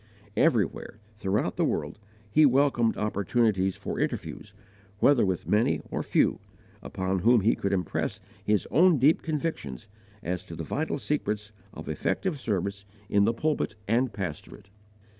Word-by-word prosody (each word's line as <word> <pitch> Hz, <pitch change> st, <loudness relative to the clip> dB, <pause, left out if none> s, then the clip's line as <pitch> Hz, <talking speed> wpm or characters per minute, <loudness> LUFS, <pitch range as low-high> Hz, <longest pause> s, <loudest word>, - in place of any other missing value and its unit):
Everywhere, -, -, +1 dB, 0.2 s
throughout 100 Hz, 0 st, -1 dB
the -, -, +2 dB
world, -, -, -2 dB, 0.3 s
he 155 Hz, -, +5 dB
welcomed 135 Hz, -4 st, +3 dB
opportunities 105 Hz, -2 st, +1 dB
for -, -, -5 dB
interviews, 105 Hz, -, -3 dB, 0.5 s
whether 135 Hz, +3 st, +4 dB
with 95 Hz, -3 st, -1 dB
many 105 Hz, -7 st, +2 dB
or -, -, -1 dB
few, -, -, +2 dB, 0.4 s
upon 95 Hz, 0 st, -2 dB
whom 115 Hz, +4 st, +4 dB
he 110 Hz, +4 st, +3 dB
could 100 Hz, -, -2 dB
impress 90 Hz, -4 st, -1 dB, 0.2 s
his 105 Hz, -2 st, +1 dB
own 175 Hz, 0 st, +5 dB
deep 140 Hz, +5 st, +4 dB
convictions 150 Hz, -, -4 dB, 0.4 s
as 90 Hz, +1 st, -3 dB
to 85 Hz, -, -9 dB
the 80 Hz, -, -5 dB
vital 145 Hz, -, -2 dB
secrets 105 Hz, -8 st, -2 dB, 0.2 s
of -, -, -10 dB
effective 145 Hz, -, -1 dB
service 100 Hz, -3 st, -2 dB, 0.3 s
in 100 Hz, 0 st, +4 dB
the 115 Hz, -, +3 dB
pulpit 150 Hz, -5 st, -1 dB
and 120 Hz, +3 st, +2 dB
pastorate. 95 Hz, 0 st, -7 dB
105 Hz, 140 wpm, -27 LUFS, 95-130 Hz, 0.5 s, he